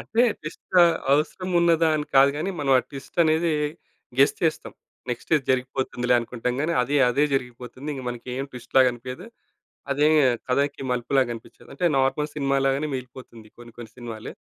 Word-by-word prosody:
అంటే 230 +2 +1 0.2
ట్విస్ట్ 155 +4 -6 0.4
అవసరం 160 +5 0
ఉన్నదా? 165 -1 +3
అని 150 - -3
కాదు 135 +1 +7
గాని. 160 +6 -2
మనం 140 - -1
ఆ - - +3
ట్విస్ట్ 140 +3 -10
అనేది 160 +1 +2 0.7
గెస్ 140 - +5
చేస్తాం. 160 -2 -1 0.4
నెక్స్ట్ 120 - -6
ఇది 145 -4 +1
జరిగిపోతుందిలే 125 -1 0
అనుకుంటాం 125 +1 -3
గానీ, 160 +3 0
అది 140 +4 -2 0.2
అదే 140 +4 +2
జరిగిపోతుంది. 125 +2 -5
ఇంగా 135 -3 -7
మనకేం 125 +2 -5
ట్విస్ట్‌లాగా 125 +1 +2
అనిపియదు. 125 - -8 0.7
అదే 145 +2 +3 0.4
కథకి 140 +3 0
మలుపులాగా 125 +1 +1
అనిపించదు. 115 - -13
అంటే 175 +6 -2
నార్మల్ 135 +3 +1
సినిమా 140 -1 0
లాగానే 135 +3 +1
మిగిలిపోతుంది 125 -3 -9
కొన్ని 120 0 -13
కొన్ని 115 -2 -10
సినిమాలు. 115 -3 -7
135 Hz, 155 wpm, -24 LUFS, 125-150 Hz, 0.7 s, కాదు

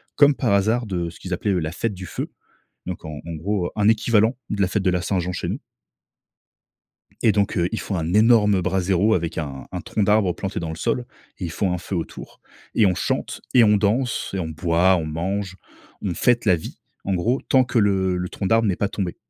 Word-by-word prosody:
comme 145 -1 +6
par 120 -6 +1
hasard, 110 +5 +2
de 90 -5 -2
ce 85 - -14
qu'ils 95 - -5
appelaient 100 +3 -1
eux 95 - +1
la 80 -1 -3
fête 105 +5 -2
du 95 0 -8
feu. - - -5 0.6
Donc 90 -2 -5
en 75 -2 -6
en 85 - -5
gros, 90 +3 -1
heu, - - -5
un 105 -1 +2
équivalent 110 +1 +3
de 105 - -1
la 95 - +3
fête 95 +1 -1
de 95 - +3
la 90 -1 0
Saint-Jean 90 -1 -1
chez - - -3
nous. - - -4 1.6
Et 110 - +6
donc 100 -1 0
heu, 85 -1 +2
ils 110 - -2
font 100 - -3
un 80 +1 -2
énorme 105 -3 +5
braséro 95 +3 +2
avec 85 -4 -1
un 70 -4 -5
un - - -4
tronc 105 - -1
d'arbre 105 -3 +3
planté 95 - -4
dans 85 -1 -4
le 80 - -4
sol 125 +9 -1 0.3
et - - -5
ils 85 - -4
font 95 +3 0
un - - -1
feu 95 +2 -5
autour, 85 - -6 0.3
et 110 - +5
on 90 -2 +3
chante - - -2
et 125 - +7
on 105 -1 +5
danse 115 +5 0
et 95 - -1
on 85 -3 -3
boit, 85 +3 +2
on 80 - -2
mange, 95 +5 -3 0.5
on 95 -4 -2
fête 120 +6 +2
la 95 -4 +5
vie 80 - -8 0.3
en 95 - 0
gros, 120 +9 0
tant 130 -1 +5
que 120 -1 0
le 95 -3 +2
le 90 0 -3
tronc 95 - -3
d'arbre 115 +2 +3
n'est 95 - +1
pas 100 - -1
tombé. 95 -4 -3
95 Hz, 235 wpm, -22 LUFS, 90-105 Hz, 1.6 s, et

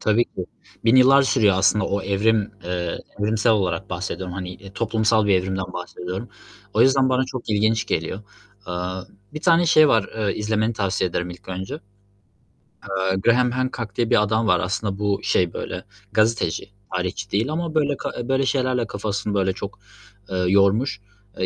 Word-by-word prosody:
Tabii 110 +2 +3
ki. 90 -5 -7 0.4
1.000 115 +3 +5
yıllar 135 +2 +7
sürüyor 110 -7 +3
aslında 95 +1 +3
o 100 0 -1
evrim, 105 +2 +1
eee, 90 -1 -3 0.2
evrimsel 110 +2 +2
olarak 95 -3 -1
bahsediyorum, 90 0 -4
hani, 90 -1 -5
eee, 95 +1 -13
toplumsal 110 0 +1
bir 100 - +4
evrimden 95 0 -1
bahsediyorum. 90 +4 -6 0.5
O - - +5
yüzden 135 0 +4
bana 130 0 +2
çok 130 -3 -6
ilginç 110 +2 +2
geliyor. 90 +1 -2 0.5
Eee, 90 - -5 0.6
bir 155 - -5
tane 170 0 +4
şey 155 -2 +6
var, 110 -6 +3
ııı, 105 -2 +1
izlemeni 110 +1 0
tavsiye 95 -4 -1
ederim 90 +1 -2
ilk 90 +2 -12
önce. 95 +1 -5 1.1
Eee, 95 -1 -1
Graham 120 +5 +3
Hancock 120 -4 -3
diye 120 -2 0
bir - - +5
adam 110 +2 +1
var. 90 -4 +4
Aslında 95 +2 -2
bu, 100 -1 0
şey, 90 -2 +1
böyle - - -5 0.3
gazeteci, 110 -6 +1 0.3
tarihçi 90 +3 -3
değil 110 +8 0
ama 165 0 -3
böyle 145 -3 +2
ka - - -4
eee, 120 +1 -5
böyle 135 0 +2
şeylerle 130 -3 0
kafasını 105 -2 -3
böyle 95 -1 +1
çok, - - -7 0.5
eee, 95 - -2
yormuş. 100 +5 +2 0.4
Eee, 95 - +1
105 Hz, 170 wpm, -22 LUFS, 95-120 Hz, 1.1 s, yıllar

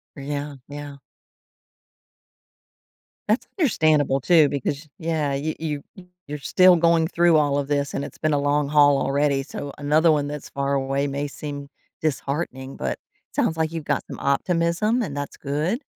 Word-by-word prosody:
Yeah, 145 0 -4
yeah. 145 0 -8 2.3
That's 220 +4 +2
understandable, 155 - +3
too, 165 -2 +5
because, 140 +2 -3
yeah, 160 -3 -1
you 145 +3 -2
you 150 -3 -3 0.4
you're 150 +1 -4
still 185 +5 +5
going 165 -1 +3
through 170 -1 +3
all 145 -1 +2
of 140 -1 -1
this, 145 -1 -1
and 140 - -2
it's - - -10
been 155 -1 0
a 145 - +2
long 145 0 +1
haul 145 -1 +5
already, 140 0 +1
so 140 0 -7
another 155 +3 +3
one 145 -2 +1
that's 145 0 -6
far 140 0 -2
away 135 +1 0
may 140 +1 -2
seem 145 -1 -7 0.3
disheartening, 140 -2 -3
but 65 -2 -3 0.4
sounds 160 - +1
like 160 0 0
you've 165 -2 -4
got 145 - 0
some - - -8
optimism, 170 - +1
and 145 -10 -4
that's 145 -1 -5
good. 155 - -2
145 Hz, 160 wpm, -23 LUFS, 140-160 Hz, 2.3 s, too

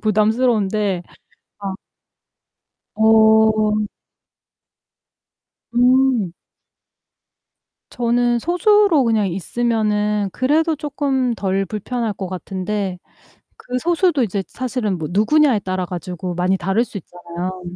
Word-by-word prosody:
부담스러운데 215 -3 +1 0.6
아. 195 -2 -4 1.2
어. 220 -1 +4 1.9
음. 250 -5 +3 1.6
저는 240 0 +1
소수로 360 - +3
그냥 220 -4 +1
있으면은 210 +1 -1
그래도 315 +5 +1
쪼끔 275 -4 -1
덜 195 -2 -1
불편할 220 +3 -3
것 190 - -5
같은데 185 +1 -4 0.6
그 250 0 -4
소수도 345 -1 +1
이제 200 -3 -1
사실은 240 -7 -3
뭐 155 -2 -4
누구냐에 245 +6 +3
따라 185 -1 -3
가지고 180 0 -5
많이 180 +2 +1
다를 195 +6 +1
수 220 - -7
있잖아요. 175 +1 -7
215 Hz, 205 characters per minute, -19 LUFS, 190-250 Hz, 1.9 s, 어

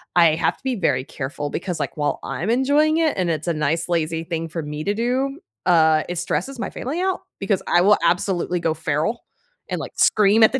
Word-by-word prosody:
I 165 -3 +6
have 165 +1 0
to - - -31
be 260 -1 -1
very 140 - +1
careful 145 +2 -5
because, 175 0 -4
like, 145 0 -4
while 145 -1 0
I'm 185 +7 -3
enjoying 285 +6 +3
it 320 -2 +2
and 180 -2 0
it's 155 +1 -3
a - - +2
nice, 155 +3 -1
lazy 165 -1 0
thing 165 -1 -3
for 165 +1 -4
me 150 +1 -5
to 205 - +1
do, 260 +6 -1 0.3
uh, 160 -3 +4
it 175 0 -4
stresses 180 - -2
my - - -2
family 305 +8 -4
out 380 0 0 0.2
because 195 -1 0
I 175 - +4
will 205 +2 +5
absolutely 175 0 +1
go 160 -2 +1
feral 160 +9 -1 0.5
and, - - -2
like, - - -6
scream 210 +1 +4
at - - +7
the 265 - +1
175 Hz, 220 wpm, -22 LUFS, 160-230 Hz, 0.5 s, at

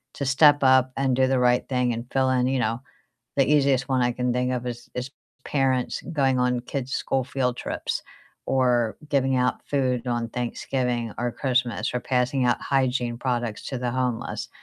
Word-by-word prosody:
to 140 - -3
step 145 +1 +6
up 130 -1 +5
and 135 -2 +1
do 130 - +3
the 130 -1 +2
right 125 0 +2
thing 125 -2 +1
and 115 +1 -5
fill 130 -1 +2
in, 125 -1 +2
you 130 0 0
know, 115 +1 -1 0.6
the 135 - +4
easiest 140 -3 +3
one 130 -1 +2
I 120 0 +2
can 125 0 -1
think 125 0 0
of 125 0 -3
is 120 0 -7
is 125 +2 -4 0.3
parents 130 -3 0
going 135 -4 +2
on 125 0 +1
kids' 130 +1 -5
school 135 -1 0
field 125 -2 -1
trips, - - -3 0.4
or 125 -4 +1
giving 135 -2 +2
out 125 0 0
food 130 -3 0
on 120 -1 -1
Thanksgiving 120 -1 -2
or 120 0 -1
Christmas, 125 -2 -1
or 125 - 0
passing 130 +1 0
out 120 - +2
hygiene 125 -3 0
products 120 -3 -2
to 130 - -3
the 120 -1 -2
homeless. 125 -2 -2
125 Hz, 185 wpm, -25 LUFS, 125-135 Hz, 0.6 s, step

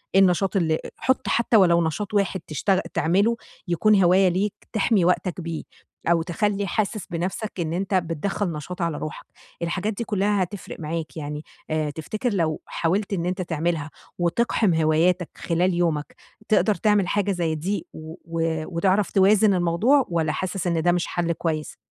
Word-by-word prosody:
إيه 195 - +7
النشاط 190 +1 +2
اللي 160 -4 +2
أ - - -6
حط 260 - 0
حتى 235 -1 +3
ولو 170 -4 +5
نشاط 205 +6 -4
واحد 200 -2 +1
تشتغل 185 +6 +1
تعمله 200 +8 +2 0.3
يكون 195 +3 +4
هواية 185 +2 +5
ليك 190 +3 0 0.2
تحمي 205 -4 +2
وقتك 180 0 0
بيه 165 -1 -4 0.5
أو 170 - +3
تخلّي 200 +4 -1
حاسس 210 +1 -1
بنَفْسك 185 +4 -3
إن 165 -1 -1
أنت 195 +2 -2
بتدَخل 180 +3 -1
نشاط 165 +4 -6
على 165 -3 -1
روحك، 155 - -6 0.4
الحاجات 190 +5 -1
دي 235 - -4
كلّها 205 -2 +1
هتفرِق 195 +1 -8
معاك 160 0 -4
يعني، 150 0 -5 0.3
آآ، 155 -1 0
تفتكر 210 - -3
لو 160 -5 0
حاولت 195 +5 -1
إن 170 -3 -1
أنت 185 +1 -2
تعملها 165 -2 -2 0.3
وتِقحم 185 +2 +2
هواياتك 165 +3 +2
خلال 175 +2 0
يومك، 165 -4 -1 0.3
تقدر 215 0 +3
تعمل 210 -4 +2
حاجة 205 +1 +1
زي 170 -3 -1
دي 200 - -3
و 160 +1 -9
و 165 -1 -1
وتعرف 190 +3 +2
توازن 200 +1 +5
الموضوع، 185 +11 +3
والّا 165 -3 0
حاسس 185 +2 -3
إن 165 -2 +1
ده 175 - +3
مش 175 -1 0
حَلّ 170 -1 -1
كويس؟ 155 -2 -3
180 Hz, 165 wpm, -24 LUFS, 165-200 Hz, 0.5 s, إيه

